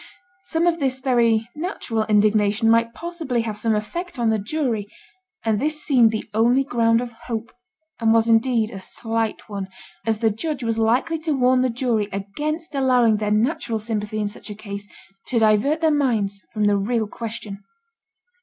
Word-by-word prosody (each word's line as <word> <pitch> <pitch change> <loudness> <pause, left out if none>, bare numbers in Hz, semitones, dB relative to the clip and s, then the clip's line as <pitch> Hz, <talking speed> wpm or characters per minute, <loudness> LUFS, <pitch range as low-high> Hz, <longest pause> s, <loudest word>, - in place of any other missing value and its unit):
Some 335 -2 -1
of 340 -1 +2
this 265 -2 0
very 235 -4 +2
natural 280 - -2
indignation 210 +1 +3
might 230 0 +2
possibly 325 -8 -2
have 220 -2 -4
some 220 +1 0
effect 340 - -4
on 235 -2 +2
the 220 - +1
jury; 225 -2 -2 0.6
and 220 -2 +2
this 300 +2 -1
seemed 245 -6 +5
the 220 -1 -4
only 240 +5 +3
ground 230 -3 +2
of 245 -1 -5 0.2
hope, 230 -2 -4 0.5
and 225 -1 +3
was 225 0 +4
indeed 225 -1 +3
a 195 - -8
slight 225 +2 -3
one, 200 -3 -5 0.4
as 225 -1 0
the 220 0 +2
judge 270 +4 -3
was 225 -1 -1
likely 250 +9 +1
to 315 -1 -1
warn 255 -1 +3
the 255 - +2
jury 230 -4 0
against 300 - -4
allowing 250 -5 +3
their 210 0 -1
natural 225 +1 0
sympathy 215 -1 -3
in 210 -1 0
such 205 - -8
a 210 - -6
case 200 -1 -7 0.4
to 250 - -1
divert 225 +8 +3
their 320 -1 +4
minds 220 -9 0
from 215 -1 -1
the 205 -1 +3
real 220 +2 0
question. 215 -2 -7
230 Hz, 175 wpm, -22 LUFS, 215-260 Hz, 0.6 s, seemed